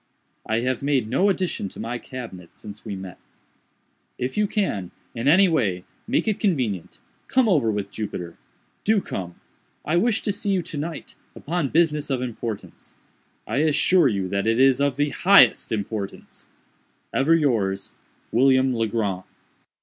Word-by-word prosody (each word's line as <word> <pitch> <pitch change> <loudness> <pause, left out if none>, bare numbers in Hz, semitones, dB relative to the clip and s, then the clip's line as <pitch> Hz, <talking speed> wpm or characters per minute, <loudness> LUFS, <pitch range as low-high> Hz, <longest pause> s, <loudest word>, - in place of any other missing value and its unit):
"I 110 +1 +1
have 130 0 -1
made 140 -5 +1
no 195 - +2
addition 185 - -1
to - - -12
my 120 +2 -4
cabinet 115 -11 -9
since 105 0 -11
we 105 -3 -5
met. 95 -2 -9 1.0
"If 125 +1 -3
you 210 0 +2
can, 185 - -1 0.2
in 115 +2 -3
any 185 +6 +6
way, 105 - 0 0.2
make 255 0 0
it 215 - 0
convenient, 125 - -1 0.3
come 260 -2 +3
over 150 - +3
with 100 -2 -3
Jupiter. 90 -6 -5 0.5
Do 220 0 +3
come. 90 - -6 0.5
I 160 +3 +1
wish 225 +3 +1
to 205 - 0
see 200 0 -1
you 185 -2 0
to 160 -2 -6
night, 160 +1 -6 0.2
upon 165 -2 -2
business 150 -2 +1
of 135 -2 0
importance. 115 -3 -7 0.5
I - - -3
assure 155 +3 +4
you 100 -6 -1
that 100 +2 -1
it 115 +2 +2
is 135 0 +5
of 140 -2 +1
the 145 +1 +1
highest 195 +2 +5
importance. 105 -2 -5 0.6
"Ever 150 +5 +4
yours, 105 -11 0 0.4
"WILLIAM 130 +1 +4
LEGRAND". 110 -5 -1
130 Hz, 155 wpm, -23 LUFS, 105-165 Hz, 1.0 s, any